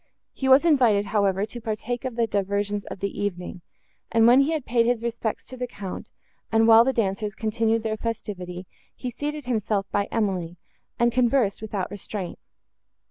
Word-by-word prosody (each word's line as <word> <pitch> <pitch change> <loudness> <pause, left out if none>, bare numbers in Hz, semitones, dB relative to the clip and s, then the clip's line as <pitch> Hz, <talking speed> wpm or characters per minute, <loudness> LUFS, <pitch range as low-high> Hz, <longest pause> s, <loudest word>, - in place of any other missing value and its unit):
He 265 - -1
was 265 +5 +7
invited, 240 -10 +4
however, 200 -1 +1
to 240 +2 -9
partake 225 +3 -3
of 255 -3 -3
the 235 -1 +2
diversions 205 0 -1
of - - -8
the 200 0 -3
evening; 180 -2 -4 0.5
and, 225 0 +4
when 245 +3 +7
he 275 +3 +3
had 310 -5 -2
paid 235 -1 +2
his 240 -1 +1
respects 230 -2 -3
to 255 - -8
the 250 0 -3
Count, 200 -5 -7 0.4
and 225 0 +4
while 225 0 +8
the 265 - +2
dancers 205 -3 -1
continued 225 +1 0
their 220 -1 -1
festivity, 190 -6 -5 0.3
he 250 - -5
seated 295 +3 -4
himself 215 -4 0
by 200 0 +1
Emily, 185 -6 -1 0.4
and 235 0 +3
conversed, 240 -4 +2
without 205 -4 -3
restraint. 200 -2 -6
220 Hz, 175 wpm, -25 LUFS, 200-240 Hz, 0.5 s, while